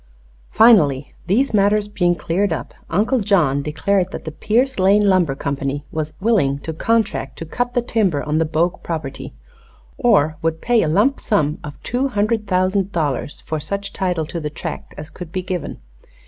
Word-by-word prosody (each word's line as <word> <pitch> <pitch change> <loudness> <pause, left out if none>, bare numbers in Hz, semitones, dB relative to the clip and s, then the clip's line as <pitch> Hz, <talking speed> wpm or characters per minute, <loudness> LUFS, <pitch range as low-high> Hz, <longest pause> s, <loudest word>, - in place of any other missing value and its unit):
Finally, 150 - +4
these 230 +7 +2
matters 205 0 +3
being 180 -4 +1
cleared 175 +5 -1
up, 145 -7 -4 0.2
Uncle 220 +9 +1
John 175 -10 +2
declared 180 +6 0
that - - -7
the 160 - -4
Pierce 240 - 0
Lane 200 +2 +4
Lumber 180 -8 +3
Company 140 +1 -3
was 155 -1 -3
willing 190 -10 +2
to 160 - -5
contract 210 - 0
to 165 - -6
cut 245 +9 -3
the 245 - +2
timber 200 -11 0
on 150 +1 0
the 165 - +2
Bogue 165 +3 0
property, 155 - -5 0.6
or 155 -10 +3
would 160 0 -1
pay 240 +2 +2
a - - +1
lump 210 - +2
sum 155 -8 0
of 145 -1 -8
two 255 +3 0
hundred 215 -2 0
thousand 185 +1 +1
dollars 145 -4 -2
for 155 - -2
such 200 +7 -4
title 180 -4 -1
to 170 - -5
the 150 -2 -3
tract 150 - -7
as 150 +1 -8
could 180 -3 -9
be 185 +1 -3
given. 180 -4 -4
180 Hz, 175 wpm, -20 LUFS, 155-210 Hz, 0.6 s, Finally